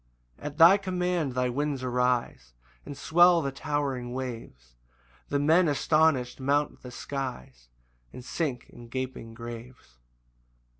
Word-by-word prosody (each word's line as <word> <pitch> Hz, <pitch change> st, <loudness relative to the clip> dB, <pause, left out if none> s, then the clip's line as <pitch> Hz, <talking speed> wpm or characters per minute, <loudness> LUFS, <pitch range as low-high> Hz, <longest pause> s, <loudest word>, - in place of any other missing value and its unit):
2 -, -, -12 dB
At 150 Hz, 0 st, -5 dB
thy 170 Hz, +4 st, +8 dB
command 180 Hz, -7 st, -1 dB
the 125 Hz, -1 st, 0 dB
winds 140 Hz, 0 st, -2 dB
arise, 125 Hz, -, -1 dB, 0.3 s
And 140 Hz, -, -7 dB
swell 175 Hz, 0 st, +5 dB
the 140 Hz, -, -2 dB
towering 135 Hz, -3 st, -3 dB
waves; 115 Hz, -, -7 dB, 0.6 s
The 140 Hz, -, +1 dB
men 160 Hz, +5 st, +4 dB
astonish'd 150 Hz, -3 st, +2 dB
mount 145 Hz, +2 st, 0 dB
the 125 Hz, -, -9 dB
skies 120 Hz, -, -6 dB, 0.4 s
And 125 Hz, -, -10 dB
sink 135 Hz, -5 st, -3 dB
in 120 Hz, -, -12 dB
gaping 125 Hz, -2 st, -5 dB
graves. 115 Hz, -, -10 dB
130 Hz, 130 wpm, -27 LUFS, 120-150 Hz, 0.6 s, thy